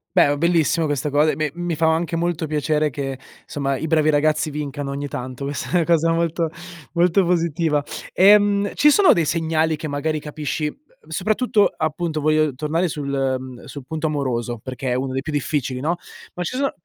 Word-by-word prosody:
Beh, - - +6
oh, 145 - 0
bellissimo 165 0 +2
questa 145 -1 -1
co 145 +2 +3
e, - - +1
beh, 155 -2 -2
mi 175 -1 -2
fa 160 +1 +3
anche 165 +1 -1
molto 170 -1 -1
piacere 150 0 0
che, 135 -1 -4 0.3
somma, 140 -2 -2
i 160 - -3
bravi 155 -1 +3
ragazzi 155 +1 +1
vincano 145 -1 -4
ogni 140 +1 -4
tanto. 130 0 -6
Questa 140 +1 -4
è - - 0
una 170 - +3
cosa 165 0 +3
molto 165 0 0 0.4
molto 180 +2 +3
positiva. 165 -3 +1 0.3
Ehm, 205 +1 +5
ci 295 - +5
sono 390 +4 +6
dei 170 - +1
segnali 160 0 +1
che 155 +1 -6
magari 150 +2 -2
capisci 150 0 -3
uhm, 450 - -13
soprattutto 215 +1 +2
appunto 155 0 -2
voglio 155 -1 +2
tornare 155 +6 -1
sul 145 -2 -4 0.3
mhmm, 130 -1 -10
sul 140 -3 -9
punto 160 0 -3
amoroso 125 -6 -2
perché 130 0 -4
è - - +2
uno 130 +1 -2
dei 135 +1 -2
più 155 - -4
difficili, 140 -3 -1
no? 160 +6 0 0.4
Ma 180 - -3
ci 255 - -4
so 275 0 +1
155 Hz, 195 wpm, -21 LUFS, 145-170 Hz, 0.4 s, Beh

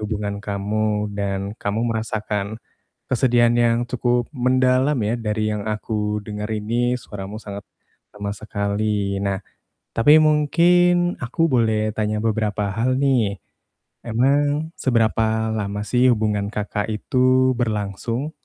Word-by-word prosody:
hubungan 105 -1 -3
kamu 105 +1 -1
dan 100 -1 -1 0.2
kamu 100 +2 -1
merasakan 110 -2 -2 0.6
kesedihan 120 -1 +3
yang 115 0 +3
cukup 120 -1 0 0.2
mendalam 130 +2 +3
ya 115 - +1
dari 105 0 0
yang 105 -1 -3
aku 105 0 -2
denger 105 -1 -5
ini 120 +3 0
suaramu 100 0 -7
sangat 100 -2 -8 0.5
lemas 100 0 -4
sekali. 100 -1 -1
Nah, 100 -1 0 0.6
tapi 130 +6 +6
mungkin 175 +4 +3
aku 125 +7 -3
boleh 110 -3 +2
tanya 105 0 0
beberapa 105 -2 -1
hal 130 +3 +1
nih, 115 -7 +2 0.7
emang 145 +6 +1
seberapa 110 -2 +1
lama 100 -1 -3
sih 125 +3 +2
hubungan 105 -2 -1
Kakak 105 0 -2
itu 130 +3 +2
berlangsung? 115 +5 -2
110 Hz, 115 wpm, -22 LUFS, 105-125 Hz, 0.7 s, tapi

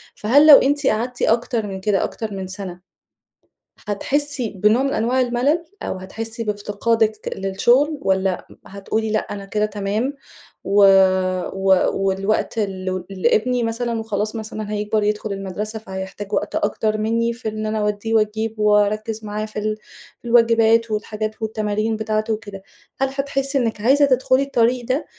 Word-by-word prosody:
فهل 280 +8 +4
لو 295 - +11
أنتِ 285 0 +1
قعدتِ 245 +3 -1
أكتر 230 -1 +1
من 190 -1 -6
كده، 200 0 +1
أكتر 220 -2 -4
من 190 -1 -5
سنة، 185 -1 -6 1.1
هتحسي 270 +4 -1
بنوع 210 +6 +2
من 275 0 0
أنواع 245 +4 +1
الملل، 255 +7 +1 0.2
أو - - -4
هتحسي 225 +5 -6
بافتقادِك 215 +1 -1
للشُغل 240 +11 +2
والّا 190 -3 0 0.2
هتقولي 215 +3 -3
لأ، 215 - +2
أنا 200 -1 -7
كده 210 +2 0
تمام 210 +5 -2 0.5
و 200 - -2 0.8
و 190 -1 +3
والوقت 195 +4 -1
ل 185 -3 -3
لإبني 220 +6 +1
مثلًا 230 0 -2
وخلاص 215 0 -2
مثلًا 215 -1 -5
هيكبر 210 0 -1
يدخل 210 0 -1
المدرسة، 200 +3 -5
فهيحتاج 190 -1 -7
وقت - - -1
أكتر 215 +1 0
منّي 230 +2 0
في 230 -1 -5
إن 215 0 -5
أنا 215 0 -1
أودّيه 210 +1 -1
وأجيبه، 220 0 0
وأركِز 215 +1 +1
معاه 210 +1 -3
في 215 0 -6
ال 215 0 -2 0.4
في - - -22
الواجبات، 230 -1 +4
والحاجات 215 +1 -4
والتمارين 215 0 -1
بتاعته 215 0 -1
وكده. 205 -3 -8 0.4
هل 270 - +3
هتحسي 275 0 -1
إنِك 225 -5 -1
عايزة 275 +6 +5
تِدخُلي 260 0 +2
الطريق 245 -2 +1
ده 260 +5 -1
215 Hz, 150 wpm, -21 LUFS, 205-235 Hz, 1.1 s, لو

